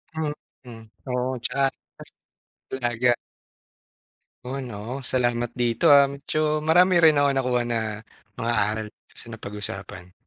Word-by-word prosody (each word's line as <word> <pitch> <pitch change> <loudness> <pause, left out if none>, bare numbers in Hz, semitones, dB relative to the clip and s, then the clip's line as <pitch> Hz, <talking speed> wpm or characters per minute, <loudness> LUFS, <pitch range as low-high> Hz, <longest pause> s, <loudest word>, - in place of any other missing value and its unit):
Mhm. 130 -7 -7 0.2
Oo, 125 +1 -1
tsaka. 135 +3 +1 1.0
Ta - - -4
talaga. 120 0 +2 1.3
Oo 135 +2 -4
'no, 120 -5 -7 0.2
salamat 120 -2 0
dito, 120 -1 +2
ah. 140 -1 +8
Medyo 150 +2 -1
marami 175 +3 +4
rin 155 -2 +6
ako 145 0 +4
nakuha 125 -2 +1
na 120 -1 0 0.6
mga 115 +1 -1 0.2
aral 110 0 -3 0.2
sa - - -10
napag-usapan. 100 -4 -5
125 Hz, 115 wpm, -24 LUFS, 120-145 Hz, 1.3 s, ah